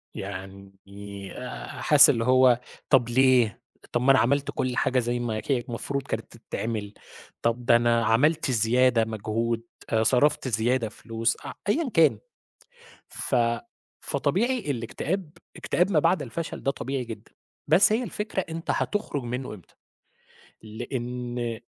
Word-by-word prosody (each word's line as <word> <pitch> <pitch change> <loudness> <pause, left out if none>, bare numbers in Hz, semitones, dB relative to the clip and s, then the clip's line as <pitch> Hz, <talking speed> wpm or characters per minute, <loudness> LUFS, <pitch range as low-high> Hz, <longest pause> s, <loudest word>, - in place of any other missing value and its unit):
يعني 100 0 -9
آآ، 125 0 -7
حاسس 150 -2 +6
اللي 115 -4 +2
هو 130 -1 +5 0.3
طَب 120 -3 +4
ليه؟ 125 -3 +3 0.3
طَب 120 - 0
ما 135 +2 +5
أنا 135 - +5
عَمَلت 140 +4 +1
كُلّ 125 -1 -2
حاجة 130 0 +2
زي 120 0 -1
ما 115 -2 -2
هي 130 -3 +3
المفروض 125 +4 -4
كانِت - - -6
تِتعمِل، 105 -3 -4 0.5
طَب 115 +1 -1
ده 120 - +6
أنا 120 -1 +3
عَمَلت 135 +5 +2
زيادة 120 +1 +3
مجهود 115 +1 -2 0.3
آآ، 110 0 +2
صَرَفت 130 +3 +2
زيادة 115 0 0
فلوس، 115 +1 -2 0.3
أيًا 295 +3 +1
كان، 160 -3 +4 0.9
ف 130 - -3 0.7
فطبيعي 240 - 0
الإكتئاب، 150 - -3 0.3
إكتئاب 180 +3 0
ما 155 - +4
بعد 165 0 +2
الفَشَل 155 +6 -5
ده 135 - +2
طبيعي 135 -1 -4
جدًا، 115 -2 -10 0.4
بس 180 +7 +6
هي 235 +3 +1
الفكرة 210 -2 -3
أنت 165 +1 -3
هتُخرج 205 - -2
منه 125 0 -4
امتى؟ 95 - -15 0.9
لإن 120 +2 -5
آآ 115 -2 -3
125 Hz, 140 wpm, -26 LUFS, 115-140 Hz, 0.9 s, حاسس